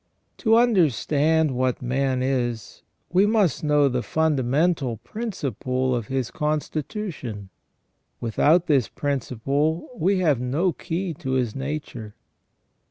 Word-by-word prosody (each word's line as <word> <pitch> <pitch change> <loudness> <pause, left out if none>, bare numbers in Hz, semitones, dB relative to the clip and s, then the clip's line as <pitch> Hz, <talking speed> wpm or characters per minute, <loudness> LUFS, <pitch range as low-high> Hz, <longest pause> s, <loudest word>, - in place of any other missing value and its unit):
To 225 -2 +3
understand 160 - +3
what 130 0 0
man 130 +1 0
is, 120 -4 -2 0.3
we 190 +3 +5
must 205 - +2
know 150 -1 +4
the 125 -2 0
fundamental 145 -2 +1
principle 130 - -3
of 120 -4 -2
his 130 -3 -2
constitution. 150 - -3 0.7
Without 150 +9 +3
this 140 -8 +2
principle 140 - -1
we 195 -1 +1
have 155 -9 +2
no 155 +9 0
key 175 +2 -3
to 135 -6 -3
his 125 -4 0
nature. 135 -6 -5
145 Hz, 110 wpm, -24 LUFS, 125-165 Hz, 0.7 s, we